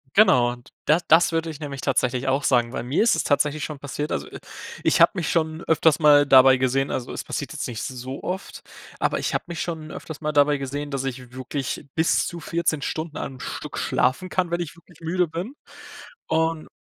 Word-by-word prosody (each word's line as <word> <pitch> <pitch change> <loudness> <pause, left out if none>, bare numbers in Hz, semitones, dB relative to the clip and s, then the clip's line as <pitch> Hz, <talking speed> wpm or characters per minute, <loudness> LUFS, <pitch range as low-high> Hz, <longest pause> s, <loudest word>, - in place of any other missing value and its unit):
Genau, 125 - +5
und 120 0 -11 0.2
da 155 +3 +4
das 165 +3 +5
würde 165 0 -1
ich 155 -2 -8
nämlich 140 -3 -6
tatsächlich 130 -1 0
auch 135 +2 +1
sagen, 120 -2 +2
weil - - -3
mir 130 - +1
ist 230 - +4
es - - -1
tatsächlich 145 +1 +1
schon 150 -3 -5
passiert. 145 +2 -4
Also, - - -2
äh, - - -10 0.4
ich - - +3
habe - - +7
mich 175 -4 -2
schon 160 -1 0
öfters 160 -1 +3
mal 145 -2 +6
dabei 130 -1 +7
gesehen 130 +2 +1
also 125 - -3
es - - -5
passiert - - -5
jetzt - - -4
nicht 115 -3 -5
so 130 +1 -6
oft, 190 +2 -5 0.4
aber - - 0
ich - - -2
habe - - 0
mich 170 -1 -5
schon 160 -3 -5
öfters 160 -1 -8
mal 150 -1 -1
dabei 145 0 +4
gesehen, 140 +2 -4
dass 135 -1 -2
ich 130 -2 -6
wirklich 130 +2 -4
bis 160 +1 +2
zu 170 - -6
14 165 -2 -1
Stunden 155 +2 -4
am 130 -2 -6
Stück - - -6
schlafen 130 +9 0
kann, 185 -1 0
wenn 170 0 0
ich 170 -2 -6
wirklich 170 -1 -20
müde 175 +2 0
bin. 175 - -5 0.7
Und 160 0 0
150 Hz, 215 wpm, -24 LUFS, 130-165 Hz, 0.7 s, habe